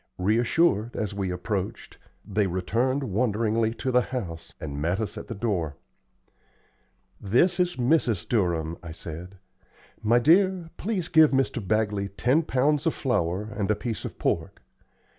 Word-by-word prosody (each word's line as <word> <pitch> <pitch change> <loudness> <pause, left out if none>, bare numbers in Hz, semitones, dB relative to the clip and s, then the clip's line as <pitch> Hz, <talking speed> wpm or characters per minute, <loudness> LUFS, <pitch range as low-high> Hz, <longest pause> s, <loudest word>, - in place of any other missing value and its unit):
Reassured, 115 - +2
as 105 -3 -2
we 100 -2 -2
approached, 90 +2 -4 0.3
they 105 -1 +1
returned 115 +10 0
wonderingly 110 0 +1
to 130 +2 -2
the 125 0 +4
house, 90 -12 -5
and 70 -1 -5
met 85 +5 0
us 110 -2 -3
at - - -7
the 115 - -5
door. 95 -9 -1 1.5
"This 170 - +2
is 180 0 +1
Mrs. 125 - +1
Durham," 85 -7 0
I 85 -2 -8
said. 85 +4 -8 0.6
"My 115 +3 +4
dear, 175 +5 +3
please 190 -4 -2
give 160 -3 +6
Mr. 135 -2 0
Bagley 105 -2 +1
ten 125 +10 +2
pounds 145 +1 +1
of 165 - +1
flour 95 - 0
and 100 -2 -1
a 105 - +3
piece 115 -1 -4
of - - -6
pork. - - -2
110 Hz, 145 wpm, -26 LUFS, 95-130 Hz, 1.5 s, give